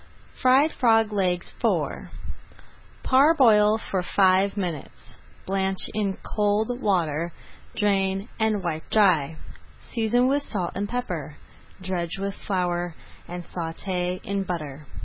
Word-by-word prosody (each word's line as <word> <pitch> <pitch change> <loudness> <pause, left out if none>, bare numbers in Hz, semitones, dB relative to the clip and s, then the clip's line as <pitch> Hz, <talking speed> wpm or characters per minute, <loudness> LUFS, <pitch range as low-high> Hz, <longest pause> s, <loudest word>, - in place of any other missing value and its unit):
FRIED 265 +5 +5
FROG 225 -3 +3
LEGS 180 -3 0
IV - - 0 0.9
Parboil 260 -7 +5
for 195 -4 -2
five 190 +2 +3
minutes, 175 -7 -5 0.3
blanch 190 0 -1 0.2
in 200 -3 -1 0.2
cold 210 +1 +2
[Page 245 +1 -6
152] - - -11
water, 170 -4 0 0.4
drain, 195 -1 +1
and 215 -3 +1
wipe 160 -2 -4
dry. 170 -8 +3 0.6
Season 240 +2 +2
with 280 +2 +2
salt 190 -10 -3
and 205 +1 -3
pepper, 180 - -4 0.4
dredge 185 -2 -3
with 195 0 -3
flour, 175 -4 -2 0.3
and 175 0 -6
sauté 180 +2 -3
in 200 0 -2
butter. 150 -6 -5
195 Hz, 120 wpm, -25 LUFS, 175-215 Hz, 0.9 s, FRIED